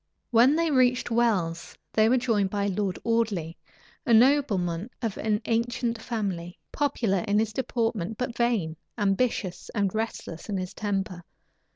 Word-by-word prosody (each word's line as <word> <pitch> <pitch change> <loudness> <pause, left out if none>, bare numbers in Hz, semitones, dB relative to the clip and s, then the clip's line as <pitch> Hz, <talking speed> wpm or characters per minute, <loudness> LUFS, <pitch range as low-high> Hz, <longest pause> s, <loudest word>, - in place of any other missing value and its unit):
When 245 +5 +6
they 330 -1 +1
reached 250 -2 +3
Wells, 195 -8 0 0.2
they 220 0 +4
were 255 - +4
joined 220 -6 +1
by 200 0 -1
Lord 195 -1 -1
Audley, 215 -8 0 0.5
a 235 -6 +4
nobleman 220 -8 +3
of 225 -5 -2
an 215 0 0
ancient 230 0 -1
family, 190 -8 -3
popular 235 -9 0
in 205 0 +2
his 215 0 +1
deportment, 225 -5 -1
but 250 -2 -3
vain, 220 -10 0 0.2
ambitious 200 -2 0
and 200 -3 +1
restless 220 -5 -4
in 200 - -1
his 185 -1 -4
temper. 195 -4 -3
220 Hz, 145 wpm, -27 LUFS, 190-235 Hz, 0.5 s, When